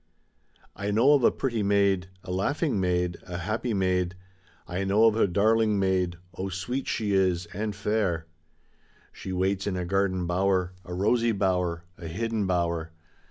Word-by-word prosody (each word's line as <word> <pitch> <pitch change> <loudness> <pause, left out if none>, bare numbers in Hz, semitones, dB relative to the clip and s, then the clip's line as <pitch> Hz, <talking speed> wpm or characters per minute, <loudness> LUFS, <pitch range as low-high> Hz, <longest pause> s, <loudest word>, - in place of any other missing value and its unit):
I 100 +1 -3
know 115 +8 +5
of 140 -4 +3
a - - +7
pretty 120 -5 -2
maid, 100 -2 +2 0.2
a 90 - -6
laughing 125 - 0
maid, 90 -1 0
a 90 -1 -6
happy 110 +7 -2
maid, 95 -2 0 0.5
I 90 +2 -2
know 100 +3 +4
of 110 -1 +4
a 110 - +3
darling 110 +3 +3
maid, 95 -3 +1 0.2
oh, 95 +2 -4
sweet 110 +9 -3
she 105 -3 -1
is 95 -2 +2
and 105 +1 -3
fair; 100 -5 0 0.9
She 95 - -7
waits 95 +2 0
in 95 -2 -1
a 90 - -2
garden 95 -1 0
bower, 90 +1 +1
a 90 - -6
rosy 115 +4 +2
bower, 90 -4 0 0.2
a 85 - -6
hidden 110 +4 -2
bower. 85 -2 0
95 Hz, 160 wpm, -27 LUFS, 90-105 Hz, 0.9 s, a